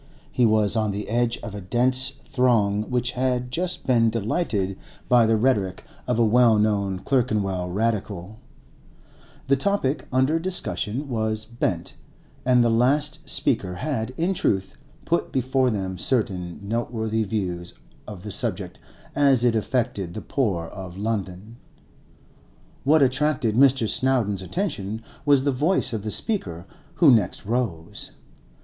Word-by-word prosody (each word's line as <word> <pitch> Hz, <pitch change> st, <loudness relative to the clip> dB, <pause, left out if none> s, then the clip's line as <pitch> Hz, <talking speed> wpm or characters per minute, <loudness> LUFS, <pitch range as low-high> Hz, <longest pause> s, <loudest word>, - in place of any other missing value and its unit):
He 125 Hz, -3 st, +3 dB
was 110 Hz, -1 st, +3 dB
on 110 Hz, -1 st, +1 dB
the 100 Hz, +1 st, -4 dB
edge 120 Hz, +1 st, +1 dB
of 110 Hz, -4 st, -6 dB
a 100 Hz, -, -6 dB
dense 130 Hz, +7 st, +1 dB
throng 110 Hz, -6 st, +1 dB
which 125 Hz, -1 st, 0 dB
had 125 Hz, -1 st, -1 dB
just 180 Hz, +6 st, -1 dB
been 115 Hz, -3 st, +3 dB
delighted 105 Hz, -, -1 dB, 0.3 s
by 120 Hz, -2 st, +5 dB
the 110 Hz, 0 st, +3 dB
rhetoric 105 Hz, -6 st, 0 dB, 0.2 s
of 125 Hz, -2 st, 0 dB
a 120 Hz, -, +4 dB
well 115 Hz, 0 st, +4 dB
known 100 Hz, -3 st, +1 dB
Clerkenwell 100 Hz, -5 st, -1 dB
Radical; 105 Hz, -1 st, -3 dB, 1.1 s
the 140 Hz, -, +3 dB
topic 145 Hz, -2 st, -1 dB
under 130 Hz, +5 st, +2 dB
discussion 150 Hz, -, -1 dB
was 110 Hz, -3 st, -2 dB
Bent, 110 Hz, -7 st, -3 dB, 0.5 s
and 125 Hz, -1 st, +4 dB
the 120 Hz, -, +3 dB
last 145 Hz, +7 st, +1 dB
speaker 100 Hz, -9 st, 0 dB
had, 120 Hz, +1 st, -2 dB
in 175 Hz, +4 st, +1 dB
truth, 95 Hz, -, -1 dB, 0.3 s
put 170 Hz, -, 0 dB
before 130 Hz, 0 st, +1 dB
them 95 Hz, -5 st, -3 dB
certain 95 Hz, -9 st, +1 dB
noteworthy 110 Hz, 0 st, -2 dB
views 90 Hz, -4 st, -4 dB, 0.3 s
of 100 Hz, -4 st, -9 dB
the 105 Hz, -, -6 dB
subject -, -, -1 dB, 0.3 s
as 135 Hz, -4 st, +3 dB
it 120 Hz, -2 st, +3 dB
affected 105 Hz, -6 st, -2 dB
the 110 Hz, -, -5 dB
poor 100 Hz, -12 st, -1 dB
of 95 Hz, 0 st, -9 dB
London. 105 Hz, 0 st, -4 dB, 1.3 s
What 150 Hz, +1 st, +4 dB
attracted 135 Hz, -3 st, +1 dB
Mr. 130 Hz, -2 st, +4 dB
Snowdon's 115 Hz, -7 st, +1 dB
attention 110 Hz, -, -3 dB, 0.2 s
was 140 Hz, -2 st, +5 dB
the 140 Hz, -, +2 dB
voice 150 Hz, +3 st, +1 dB
of 110 Hz, -, -2 dB
the 110 Hz, -, -4 dB
speaker 95 Hz, -, -2 dB, 0.3 s
who 160 Hz, -6 st, +6 dB
next 105 Hz, -6 st, +2 dB
rose. 105 Hz, -8 st, -3 dB
115 Hz, 140 wpm, -24 LUFS, 100-130 Hz, 1.3 s, who